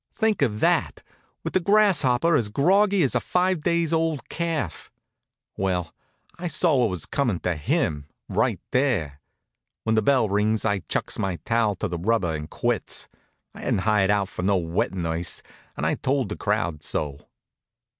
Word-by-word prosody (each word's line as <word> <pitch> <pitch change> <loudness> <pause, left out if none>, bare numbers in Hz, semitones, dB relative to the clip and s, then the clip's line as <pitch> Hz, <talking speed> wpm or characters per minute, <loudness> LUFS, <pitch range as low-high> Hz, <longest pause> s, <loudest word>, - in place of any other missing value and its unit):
Think 220 -5 +1
of 110 -6 +1
that, - - +1 0.4
with - - -4
the - - +4
Grasshopper 170 -7 +3
as 115 -7 +1
groggy 190 - +3
as 135 - +1
a - - +2
five 180 -2 0
days 170 0 +1
old 160 -5 0
calf! 165 - -3 0.7
Well, 90 -4 -1 0.5
I 175 - -3
saw 160 -1 +2
what 120 -3 +3
was 90 -5 -3
coming 120 -11 0
to 90 -1 -1
him, 75 -1 -1 0.2
right - - 0
there. 95 - 0 0.6
When 110 - +1
the 110 - +3
bell 130 -1 +3
rings 105 +2 +1
I 100 -2 +1
chucks - - -2
my 95 -2 -1
towel 115 -3 +2
to 95 - -4
a 90 -4 -2
rubber 95 -3 +1
and 75 0 -5
quits. 120 -4 -2 0.5
I - - -12
hadn't 95 - 0
hired 105 -1 +2
out 100 -1 +2
for - - -6
no 95 +1 +2
wet 85 0 -1
nurse, 85 -1 -2 0.3
and - - -2
I - - +2
told 135 -5 0
the 105 - -3
crowd 100 -7 -1
so. 75 -2 -4
110 Hz, 170 wpm, -24 LUFS, 90-150 Hz, 0.7 s, the